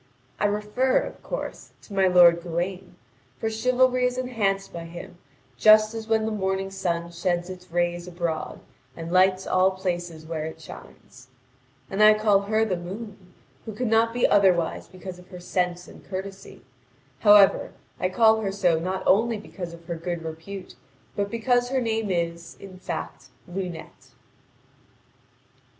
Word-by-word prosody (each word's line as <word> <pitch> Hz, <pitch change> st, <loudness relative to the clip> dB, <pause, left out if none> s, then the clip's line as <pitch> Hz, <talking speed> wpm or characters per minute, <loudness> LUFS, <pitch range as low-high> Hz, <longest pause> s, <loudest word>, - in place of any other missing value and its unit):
I -, -, +1 dB
refer, 210 Hz, +6 st, +1 dB
of -, -, -8 dB
course, -, -, -6 dB
to 205 Hz, -, -12 dB
my 195 Hz, -1 st, +3 dB
lord 175 Hz, -2 st, +6 dB
Gawain, 180 Hz, +2 st, -4 dB, 0.4 s
for 225 Hz, -, -2 dB
chivalry 250 Hz, +2 st, +2 dB
is 250 Hz, 0 st, -4 dB
enhanced 215 Hz, -6 st, -1 dB
by 170 Hz, -1 st, -6 dB
him 175 Hz, +2 st, -10 dB, 0.4 s
just 215 Hz, -, +6 dB
as 225 Hz, -1 st, -6 dB
when 220 Hz, -1 st, +2 dB
the 220 Hz, -, -2 dB
morning 195 Hz, -2 st, -2 dB
sun 170 Hz, -3 st, -2 dB
sheds 175 Hz, +1 st, -2 dB
its 180 Hz, 0 st, -11 dB
rays 175 Hz, 0 st, -1 dB
abroad 170 Hz, -3 st, -4 dB, 0.4 s
and 165 Hz, 0 st, -6 dB
lights 185 Hz, +1 st, +3 dB
all 185 Hz, +1 st, +3 dB
places 175 Hz, -4 st, -4 dB
where 160 Hz, -1 st, -4 dB
it 160 Hz, 0 st, -7 dB
shines. 130 Hz, -4 st, -13 dB, 0.6 s
And 195 Hz, -, -2 dB
I 215 Hz, 0 st, +8 dB
call 215 Hz, -2 st, +3 dB
her 215 Hz, +2 st, +1 dB
the 185 Hz, -5 st, -1 dB
moon, 190 Hz, +1 st, -9 dB, 0.3 s
who 220 Hz, -, -6 dB
cannot 230 Hz, -1 st, +2 dB
be 240 Hz, +1 st, +2 dB
otherwise 185 Hz, -5 st, +2 dB
because 185 Hz, -1 st, -9 dB
of 180 Hz, -, -16 dB
her 180 Hz, -2 st, -10 dB
sense 180 Hz, 0 st, -2 dB
and -, -, -14 dB
courtesy. 195 Hz, +1 st, -8 dB, 0.6 s
However, 205 Hz, +1 st, +6 dB, 0.3 s
I 185 Hz, -, 0 dB
call 220 Hz, +3 st, +4 dB
her 195 Hz, -2 st, -1 dB
so 180 Hz, -5 st, +2 dB
not 185 Hz, +3 st, -3 dB
only 225 Hz, +3 st, +3 dB
because 185 Hz, -4 st, -8 dB
of 170 Hz, 0 st, -13 dB
her 170 Hz, -, -4 dB
good 170 Hz, 0 st, -4 dB
repute, 165 Hz, +4 st, -8 dB, 0.4 s
but 200 Hz, 0 st, -1 dB
because 245 Hz, +2 st, +1 dB
her 265 Hz, 0 st, +1 dB
name 225 Hz, -3 st, -1 dB
is, 170 Hz, -1 st, -3 dB
in 185 Hz, -2 st, -11 dB
fact, 160 Hz, -6 st, -6 dB, 0.2 s
Lunete. 175 Hz, -8 st, -7 dB
190 Hz, 155 wpm, -25 LUFS, 175-215 Hz, 0.6 s, I